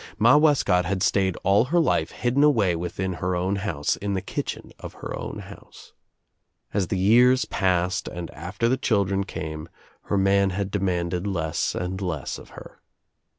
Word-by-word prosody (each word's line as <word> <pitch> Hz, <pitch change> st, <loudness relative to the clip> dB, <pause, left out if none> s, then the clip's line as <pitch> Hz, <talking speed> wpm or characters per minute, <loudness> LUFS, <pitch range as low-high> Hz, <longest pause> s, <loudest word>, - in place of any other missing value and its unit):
Ma 115 Hz, +6 st, +6 dB
Wescott 145 Hz, -, +4 dB
had 95 Hz, +1 st, -1 dB
stayed 95 Hz, 0 st, +1 dB
all 100 Hz, +5 st, +4 dB
her 170 Hz, +7 st, +2 dB
life 165 Hz, -, +1 dB
hidden 125 Hz, +4 st, 0 dB
away 110 Hz, -, +3 dB
within 90 Hz, +2 st, -3 dB
her 90 Hz, 0 st, 0 dB
own 95 Hz, +3 st, 0 dB
house, 85 Hz, -8 st, -1 dB
in 100 Hz, 0 st, -3 dB
the -, -, 0 dB
kitchen -, -, -5 dB
of -, -, -8 dB
her -, -, -7 dB, 0.3 s
house. -, -, -13 dB, 0.8 s
As 95 Hz, -3 st, 0 dB
the 95 Hz, -, -1 dB
years 125 Hz, +7 st, +5 dB
passed 90 Hz, 0 st, 0 dB
and 85 Hz, -1 st, -6 dB
after 90 Hz, +8 st, -3 dB
the 130 Hz, +2 st, +2 dB
children 100 Hz, -6 st, +1 dB
came 80 Hz, -3 st, -6 dB, 0.4 s
her 100 Hz, -, 0 dB
man 100 Hz, 0 st, +3 dB
had, 95 Hz, +1 st, -3 dB
demanded 90 Hz, -2 st, -1 dB
less 85 Hz, -5 st, -1 dB
and 95 Hz, +2 st, -3 dB
less 85 Hz, -7 st, -3 dB
of -, -, -14 dB
her. -, -, -12 dB
95 Hz, 165 wpm, -24 LUFS, 90-105 Hz, 0.8 s, Ma